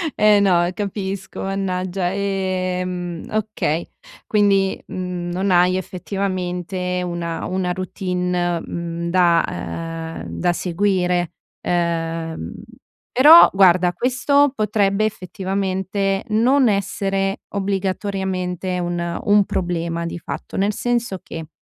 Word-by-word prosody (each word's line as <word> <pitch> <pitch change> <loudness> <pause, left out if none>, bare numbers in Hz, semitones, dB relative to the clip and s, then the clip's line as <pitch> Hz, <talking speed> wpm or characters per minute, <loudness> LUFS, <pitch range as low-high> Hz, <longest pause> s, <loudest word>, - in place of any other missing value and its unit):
Eh 210 -1 +5
no, 175 -3 +3
capisco. 195 -1 -4
Mannaggia! 185 -1 -2
Ehm, 185 -3 -2
okay. 210 -7 -1 0.4
Quindi, 200 -2 +2
mhmm, 180 -1 -4
non 190 +2 0
hai 180 +1 +4
effettivamente 180 -1 -3
una 170 -1 -3
una 185 -1 -1
routine, 180 -2 -1
mhmm, 170 0 -4
da, 170 -2 +4
ehm 165 0 -5 0.2
da 175 - +2
seguire. 180 -1 0 0.3
Ehm, 165 - -2 0.6
però 300 +7 +9
guarda, 185 -2 +5
questo 260 - +2
potrebbe 210 -2 +1
effettivamente 195 0 -1
non 245 +4 +4
essere 195 0 -1
obbligatoriamente 190 -2 -2
un 175 -1 -2
un 205 0 +5
problema 170 -2 -2
di 170 - -4
fatto, - - -7
nel 200 +2 +2
senso 235 -4 -1
che: 160 -1 -7
185 Hz, 100 wpm, -21 LUFS, 175-200 Hz, 0.6 s, però